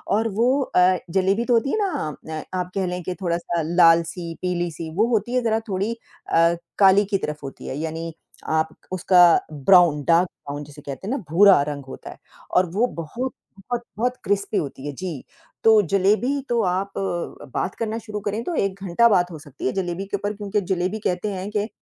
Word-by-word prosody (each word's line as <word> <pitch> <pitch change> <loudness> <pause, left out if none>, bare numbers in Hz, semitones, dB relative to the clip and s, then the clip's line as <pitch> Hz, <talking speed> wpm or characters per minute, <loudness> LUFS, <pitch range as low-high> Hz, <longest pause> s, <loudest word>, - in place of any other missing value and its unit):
और 225 +2 +1
वो 240 +2 +4
अ, 185 -7 +3
ज़लेबी 195 +5 +1
तो 245 - +2
होती 235 +4 +2
है - - 0
ना, 290 - -2
न 155 -1 -4 0.2
आप 180 0 -4
कह 195 -1 0
लें 180 0 -3
कि 180 +2 -4
थोड़ा-सा 170 -1 -1
लाल 170 -1 +6
सी, 170 -2 -6
पीली 175 -1 -1
सी 160 0 -7
वो 215 +5 +3
होती 235 +1 0
है 250 - +3
ज़रा 225 -1 +1
थोड़ी 200 +4 -1 0.4
अ, 165 +1 +4 0.2
काली 195 +1 +6
की 195 - +3
तरफ 150 -5 -5
होती 135 - -8
है, 135 - -4
यानी 165 +1 -4 0.4
आप 160 0 +1 0.2
उसका 185 0 +3 0.3
ब्राउन 155 0 +5
डार्क 170 +2 +4 0.2
ब्राउन 145 +1 -5
जिसे 145 0 -13
कहते 140 +5 -7
हैं - - -2
ना - - -1
भूरा 190 -1 +7
रंग 140 -2 -5
होता 135 - -9
है। - - -13 0.3
और 185 - +4
वो 220 +7 +2
बहुत 240 +12 -4 0.2
बहुत-बहुत 240 +3 -3
क्रिस्पी 200 +1 0
होती 140 -1 -4
है, - - -3
जी, 160 -2 -6 0.4
तो 220 -1 +7
ज़लेबी 215 - +2
तो 235 -1 +2
आप 190 +2 -1 0.6
बात 185 - -2
करना 225 -1 -2
शुरू 215 -2 -6
करें 210 +2 -3
तो 345 - -2
1 195 -5 -1
घंटा 195 +5 +4
बात 180 -4 +2
हो 160 - -8
सकती 145 -2 -9
है - - +1
ज़लेबी 185 0 -3
के 200 - -2
ऊपर 205 +1 -3
क्योंकि 205 0 -1
ज़लेबी 185 +4 -2
कहते 180 +3 -1
हैं 190 +1 -5
कि 210 0 -1
185 Hz, 205 wpm, -23 LUFS, 165-210 Hz, 0.6 s, भूरा